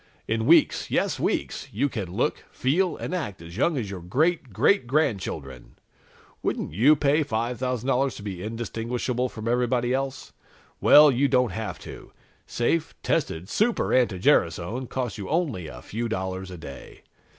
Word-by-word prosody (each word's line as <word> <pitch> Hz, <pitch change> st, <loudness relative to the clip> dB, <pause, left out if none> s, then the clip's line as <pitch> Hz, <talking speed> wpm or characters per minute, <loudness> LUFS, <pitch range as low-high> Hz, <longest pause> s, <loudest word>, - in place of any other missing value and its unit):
In 110 Hz, 0 st, 0 dB
weeks -, -, +4 dB
yes, -, -, 0 dB
weeks -, -, -2 dB
you 130 Hz, +8 st, +1 dB
can 105 Hz, -9 st, -4 dB
look, 90 Hz, -, -1 dB
feel 170 Hz, +8 st, +1 dB
and -, -, -5 dB
act 110 Hz, -, -3 dB
as 85 Hz, +1 st, -11 dB
young 150 Hz, -, +1 dB
as 105 Hz, -6 st, -3 dB
your 95 Hz, -3 st, -6 dB
great 140 Hz, -, 0 dB
great 125 Hz, -, +3 dB
grandchildren! 95 Hz, -, -2 dB, 0.7 s
Wouldn't -, -, -2 dB
you 130 Hz, -, +5 dB
pay 145 Hz, +2 st, +2 dB
$5,000 125 Hz, +1 st, -1 dB
to -, -, -9 dB
be 95 Hz, -4 st, -5 dB
indistinguishable 120 Hz, +3 st, -2 dB
from 110 Hz, -1 st, -7 dB
everybody 120 Hz, +1 st, +1 dB
else? 135 Hz, 0 st, -3 dB, 0.5 s
Well, 150 Hz, 0 st, +8 dB
you 135 Hz, +3 st, +2 dB
don't 125 Hz, -4 st, +2 dB
have 110 Hz, +4 st, -4 dB
to. -, -, -10 dB, 0.4 s
Safe, 150 Hz, +7 st, 0 dB
tested 80 Hz, +3 st, -1 dB
Super 215 Hz, -, +1 dB
anti 120 Hz, -7 st, +3 dB
gerasone 105 Hz, -, +1 dB
costs 125 Hz, -4 st, -3 dB
you 100 Hz, -, -6 dB
only 145 Hz, -, -1 dB
a -, -, -10 dB
few 115 Hz, +2 st, -4 dB
dollars 95 Hz, -2 st, -3 dB
a 90 Hz, -, -8 dB
day. 70 Hz, -4 st, -11 dB
120 Hz, 155 wpm, -25 LUFS, 100-135 Hz, 0.7 s, Well